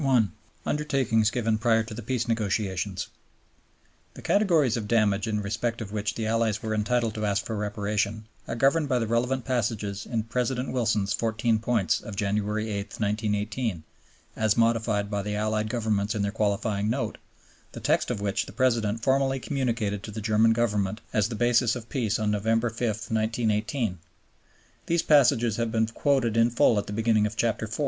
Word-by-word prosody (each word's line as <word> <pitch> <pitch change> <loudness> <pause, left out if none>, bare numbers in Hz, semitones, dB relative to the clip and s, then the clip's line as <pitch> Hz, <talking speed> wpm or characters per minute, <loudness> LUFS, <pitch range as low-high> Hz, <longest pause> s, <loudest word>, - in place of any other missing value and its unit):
Undertakings 130 -7 +1
given 115 -2 0
prior 115 -1 +3
to 110 - -8
the 115 - -6
Peace 120 +1 -2
Negotiations 100 -4 -1 1.1
The - - -11
categories 165 - +3
of 110 -3 -3
damage 105 -2 +2
in 105 -1 -1
respect 115 +3 -2
of 105 -4 -6
which 105 0 -2
the 110 - -3
Allies 110 -1 0
were 110 -1 -2
entitled 115 +1 0
to 110 0 -3
ask 100 0 0
for 110 - -3
Reparation 105 0 -2 0.2
are - - -3
governed 140 +5 +2
by 130 - +2
the 115 - 0
relevant 125 +3 0
passages 105 -5 -2
in 115 -3 -1
President 125 +2 -2
Wilson's 110 -5 +1
Fourteen 115 0 0
Points 115 -3 +1
of 110 - -8
January 105 +2 -1
8, 100 - -1 0.2
1918, 105 -2 -1 0.5
as 110 0 +1
modified 115 -3 +1
by 100 -1 -1
the 105 +1 -3
Allied 110 0 -1
Governments 110 -3 0
in 105 - 0
their 100 - -1
qualifying 105 0 0
Note, 130 +4 -2 0.5
the - - -7
text - - +1
of - - -2
which 100 +1 -1
the - - -8
President 115 -4 +1
formally 135 0 +2
communicated 115 -7 -1
to - - -8
the 105 +1 -6
German 110 +1 +3
Government 105 -3 0
as 105 0 +2
the 115 - -4
basis 120 +1 +3
of 115 -2 -8
peace 115 -6 0
on 110 -2 0
November 115 +3 +1
5, 115 - -11
1918. 110 - -1 0.9
These 170 0 +2
passages 120 -7 +4
have 115 -1 -1
been 110 0 +2
quoted 120 0 +1
in 115 +1 +5
full 115 -2 +3
at 100 - -5
the 105 - -5
beginning 110 -1 +2
of 105 +1 -8
Chapter 110 -1 0
IV. 110 +5 -6
110 Hz, 175 wpm, -26 LUFS, 105-120 Hz, 1.1 s, in